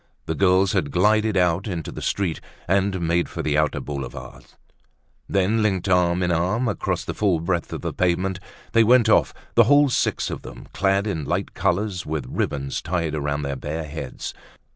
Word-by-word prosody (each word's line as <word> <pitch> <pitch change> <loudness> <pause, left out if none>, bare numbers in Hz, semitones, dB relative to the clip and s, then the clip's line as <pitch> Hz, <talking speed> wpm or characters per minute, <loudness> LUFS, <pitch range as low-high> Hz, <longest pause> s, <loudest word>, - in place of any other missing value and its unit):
The 80 - -2
girls 95 +1 +3
had - - 0
glided 105 +5 +2
out 90 +2 +2
into 85 -6 -4
the - - -8
street 95 -5 -1 0.3
and 95 0 +1
made 85 +1 +1
for - - -5
the 75 -1 0
outer 75 -1 +1
Boulevards. 70 -2 -8 0.7
Then, 100 +3 +2
linked 100 -3 0
arm 90 -1 +3
in 90 - +1
arm 95 +9 +1
across 95 -3 -2
the - - -3
full 95 -6 +1
breadth 85 +1 -2
of - - -5
the - - -3
pavement, 90 +1 0 0.3
they 115 - +5
went 120 +1 +5
off, - - +4 0.2
the - - +6
whole 145 0 +5
six - - 0
of - - -5
them, - - -11
clad 95 +1 +1
in 80 -9 -2
light 90 +6 -2
colors, 95 0 -1
with 75 -1 -3
ribbons 70 -1 -2
tied 85 -2 -2
around 75 -1 -2
their 70 -1 -2
bare 75 +4 -4
heads. 75 -3 -6
90 Hz, 185 wpm, -23 LUFS, 80-100 Hz, 0.7 s, the